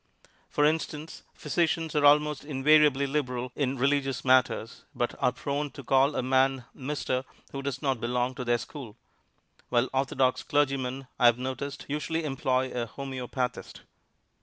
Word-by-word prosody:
For 145 - +2
instance, 155 0 -2
physicians 160 0 -1
are 150 - +2
almost 150 0 +3
invariably 145 0 +4
liberal 125 -3 -2
in 135 -2 -1
religious 135 0 0
matters, 130 -3 +2
but 120 - -1
are 125 - +3
prone 145 +2 -3
to 140 - -9
call 135 +3 +3
a - - 0
man 130 0 +2
"Mister" 130 -2 -2 0.3
who 135 - -5
does 140 0 -4
not 135 -4 0
belong 125 +2 0
to 130 -1 -5
their 120 -1 +2
school; 120 -2 -9 0.7
while 120 +2 +2
orthodox 130 -1 +1
clergymen, 135 -2 0
I 120 - +7
have 120 0 +5
noticed, 130 +2 -5
usually 155 +3 -2
employ 130 -2 0
a 120 -1 -3
homeopathist. 130 -1 -5
135 Hz, 145 wpm, -28 LUFS, 125-145 Hz, 0.7 s, I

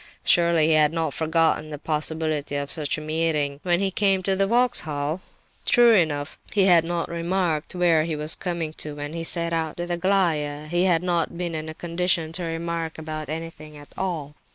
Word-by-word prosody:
Surely 170 -2 +4
he - - +4
had 155 -1 +4
not 165 -1 -2
forgotten 160 -1 +1
the 150 - -6
possibility 155 -1 -1
of 140 0 -3
such 150 -2 0
a - - -6
meeting 155 -2 -1
when 175 -1 +1
he 195 0 0
came 195 -1 +1
to 195 +1 +1
the 195 +1 +1
Vauxhall? 160 -9 0 0.4
True 240 -1 +5
enough, 155 -6 0
he 200 -3 +3
had 175 -4 +6
not 170 0 -2
remarked 170 -1 -2
where 170 -3 +3
he 160 -1 -3
was 150 +1 0
coming 170 -4 -3
to 150 -1 -4
when 145 +1 -6
he 165 0 -4
set 170 0 +2
out 160 -2 -2
with 175 0 -4
Aglaya; 170 -5 0
he 175 +4 0
had 175 -2 +2
not 175 -1 -1
been 175 -1 -3
in 155 0 -4
a 155 - -8
condition 170 -1 0
to 175 +2 -3
remark 165 0 -3
anything 155 0 -6
at 145 0 -13
all. 165 -6 -3
165 Hz, 190 wpm, -24 LUFS, 155-175 Hz, 0.4 s, had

